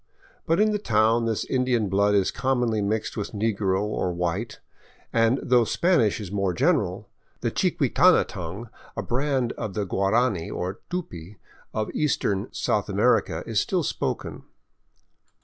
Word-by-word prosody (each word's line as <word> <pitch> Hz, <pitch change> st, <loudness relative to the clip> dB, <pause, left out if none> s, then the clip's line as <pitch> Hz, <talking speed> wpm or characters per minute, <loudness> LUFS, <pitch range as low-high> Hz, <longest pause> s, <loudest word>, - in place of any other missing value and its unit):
But 165 Hz, +2 st, +2 dB
in 215 Hz, 0 st, +4 dB
the 210 Hz, -, -1 dB
town 115 Hz, -, +2 dB
this 110 Hz, -2 st, -1 dB
Indian 125 Hz, -4 st, +1 dB
blood 100 Hz, +2 st, +2 dB
is 100 Hz, -2 st, +2 dB
commonly 125 Hz, -4 st, 0 dB
mixed 105 Hz, +2 st, -2 dB
with 105 Hz, 0 st, -4 dB
negro 100 Hz, -3 st, 0 dB
or 105 Hz, -3 st, -1 dB
white, 90 Hz, +6 st, -3 dB, 0.5 s
and 115 Hz, +3 st, +3 dB
though 125 Hz, -1 st, +4 dB
Spanish 135 Hz, -, +2 dB
is 100 Hz, -4 st, -7 dB
more 100 Hz, -3 st, 0 dB
general, 110 Hz, -, +1 dB, 0.3 s
the -, -, -1 dB
chiquitana -, -, +3 dB
tongue, 95 Hz, +7 st, -7 dB, 0.3 s
a -, -, -2 dB
branch 130 Hz, -1 st, 0 dB
of 105 Hz, -5 st, -4 dB
the 105 Hz, -, -1 dB
Guarani 100 Hz, 0 st, +1 dB
or 95 Hz, +4 st, -4 dB
Tupy 105 Hz, -, -6 dB, 0.4 s
of 110 Hz, -1 st, -2 dB
eastern 105 Hz, -9 st, 0 dB
South -, -, -1 dB
America, -, -, +2 dB
is -, -, 0 dB
still -, -, 0 dB
spoken. -, -, -3 dB
110 Hz, 145 wpm, -25 LUFS, 100-125 Hz, 0.5 s, in